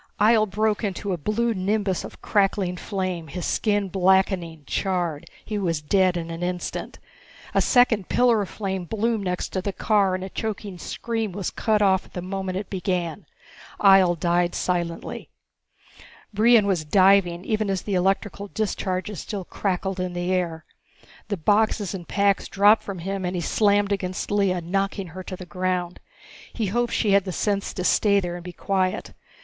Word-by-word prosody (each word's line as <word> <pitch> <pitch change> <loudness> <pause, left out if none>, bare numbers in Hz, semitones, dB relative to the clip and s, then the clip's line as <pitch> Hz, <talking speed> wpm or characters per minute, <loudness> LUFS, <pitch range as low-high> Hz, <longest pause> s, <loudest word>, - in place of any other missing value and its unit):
Ihjel 215 0 +4
broke 215 +2 0
into 200 -1 -2
a - - -2
blue 230 +7 0
nimbus 200 -1 -1
of - - -11
crackling 195 -3 +1
flame, 185 -3 -3
his 175 +4 -5
skin 205 -2 +1
blackening, 185 -3 +1
charred. 175 -5 -2 0.2
He 215 -2 -3
was 170 -5 0
dead 185 +3 +2
in 165 0 -5
an 165 +1 -6
instant. 180 0 -4 0.6
A - - +3
second 240 -6 +3
pillar 240 -3 +3
of 195 - -4
flame 190 -3 -4
bloomed 220 +1 -1
next 180 -1 -2
to 185 - -2
the 200 - -2
car, 200 -2 +2
and 185 - -4
a 190 - -5
choking 205 -3 -5
scream 225 -2 -3
was 195 0 -3
cut 215 -2 +1
off 190 -1 +3
at - - -21
the 180 - -4
moment 190 0 -3
it 195 0 -4
began. 180 -2 -3 0.5
Ihjel 190 -4 +5
died 175 +1 +1
silently. 175 -2 -3 1.0
Brion 220 +1 +5
was 185 -5 +1
diving 185 +1 +4
even 215 -2 0
as 195 -1 -1
the 205 - -3
electrical 195 +2 0
discharges 195 -2 -3
still 200 -4 -5
crackled 190 0 -2
in 180 -1 -2
the 175 +1 -1
air. 170 -3 -2 0.6
The 200 - -2
boxes 205 +2 +1
and 180 -3 -7
packs 200 0 +1
dropped 205 +3 +5
from 200 -2 -6
him 195 +3 -4
and 180 +1 -2
he 175 - -1
slammed 205 0 +2
against 185 -1 -2
Lea, 195 -3 +2
knocking 195 +2 -2
her 185 +3 -8
to 185 0 -6
the 185 - -9
ground. 180 0 -2 0.5
He 225 - -1
hoped 240 +5 0
she 210 - +1
had 200 0 +5
the 185 - -3
sense 200 +2 -1
to 180 - -3
stay 200 +2 +4
there 175 -2 -3
and 175 0 -7
be 180 - -7
quiet. 185 +1 -1
190 Hz, 175 wpm, -24 LUFS, 180-205 Hz, 1.0 s, Ihjel